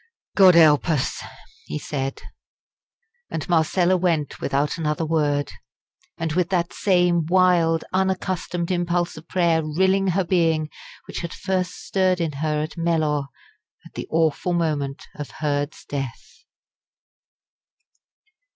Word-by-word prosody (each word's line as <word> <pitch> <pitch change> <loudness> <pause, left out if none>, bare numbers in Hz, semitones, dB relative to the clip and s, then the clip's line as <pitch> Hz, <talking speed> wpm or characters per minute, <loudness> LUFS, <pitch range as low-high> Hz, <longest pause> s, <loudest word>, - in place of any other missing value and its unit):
"God 185 -3 +7
help 155 -1 +5
us!" 150 -5 0 0.5
he - - -4
said; 135 -2 -4 1.1
and 160 - -4
Marcella 175 +2 +2
went 170 -5 -1
without 140 +4 -1
another 155 0 -1
word, 145 -3 0 0.7
and 165 -2 -2
with 175 0 +1
that 175 -2 0
same 175 -4 +2
wild, 175 -3 +3
unaccustomed 185 -2 -1
impulse 175 -1 0
of 160 +1 -12
prayer 170 -3 +2
rilling 190 +5 +1
her 190 +1 +1
being 165 -3 +1 0.3
which - - -6
had 170 -1 -5
first 185 -1 -2
stirred 185 -1 +1
in 165 -2 -1
her 150 -1 0
at 155 +2 -7
Mellor 155 -4 0 0.6
at - - -15
the - - -6
awful 165 +2 +1
moment 150 -5 -1
of 145 -2 -7
Hurd's 145 -1 -3
death. 140 - -7
165 Hz, 125 wpm, -23 LUFS, 150-180 Hz, 1.1 s, God